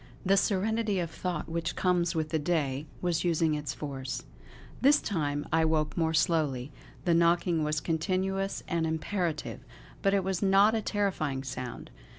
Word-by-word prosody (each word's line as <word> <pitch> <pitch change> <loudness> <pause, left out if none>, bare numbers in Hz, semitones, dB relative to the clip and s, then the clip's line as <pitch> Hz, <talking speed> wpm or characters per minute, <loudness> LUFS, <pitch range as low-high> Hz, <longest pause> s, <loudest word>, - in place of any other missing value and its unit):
The 195 +1 +5
serenity 210 +2 +1
of 170 -2 -2
thought 180 0 -3
which 165 0 -2
comes 175 -1 +1
with 155 -1 -1
the 160 - 0
day 150 -3 -1 0.2
was 175 -2 +1
using 165 -2 +2
its 145 -4 -3
force.... 135 -1 -5 0.6
This 285 +3 +6
time 145 -6 -2
I 165 0 +4
woke 155 -1 +1
more 160 -1 +1
slowly. 150 -5 +1 0.3
The 175 - +3
knocking 170 -1 +3
was 150 0 0
continuous 190 +5 -1
and 165 -1 0
imperative; 160 0 -2 0.4
but 195 0 +3
it 195 - +2
was 190 -1 -1
not 200 +2 +5
a 225 - +1
terrifying 180 -11 -1
sound. 130 -2 -6
165 Hz, 160 wpm, -29 LUFS, 150-190 Hz, 0.6 s, This